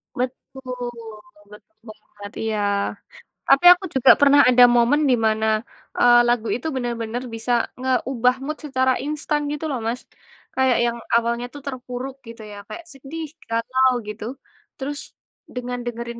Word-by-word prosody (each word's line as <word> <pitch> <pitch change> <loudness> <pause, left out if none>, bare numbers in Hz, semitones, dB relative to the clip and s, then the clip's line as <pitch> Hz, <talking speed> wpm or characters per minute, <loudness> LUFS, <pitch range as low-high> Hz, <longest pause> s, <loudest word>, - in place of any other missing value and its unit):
Betul, 250 0 -5 0.6
betul 210 +1 -17
banget, 205 -1 -12
iya. 220 -1 -1 0.9
Tapi, 275 +6 +4
aku 360 +2 -8
juga 265 - +7
pernah 285 0 +7
ada 250 0 +6
momen, 240 +6 +3
di 250 - +5
mana, 220 0 0 0.5
eee, 240 0 +6
lagu 240 -2 +1
itu 250 +6 -5
benar-benar 240 -1 -3
bisa 225 +2 -4 0.3
ngeubah 255 -1 +1
mood 305 +2 -4
secara 260 -2 +1
instan, 300 0 -2
gitu, 300 +2 -4
loh, 265 -4 -2
Mas. 240 +2 -2 0.5
Kayak, 260 -2 +3
yang 235 0 -1 0.2
awalnya 235 +1 +1
tuh, 285 - -9
terpuruk 255 0 -6
gitu, 230 0 -10
ya, 205 - -10
kayak 340 0 -9
sedih, 295 +4 -7 0.2
galau 255 +3 +2
gitu. 210 0 -6 0.5
Terus, 285 +2 -4 0.6
dengan 245 0 -4
dengerin 235 0 -5
250 Hz, 140 wpm, -22 LUFS, 235-270 Hz, 0.9 s, juga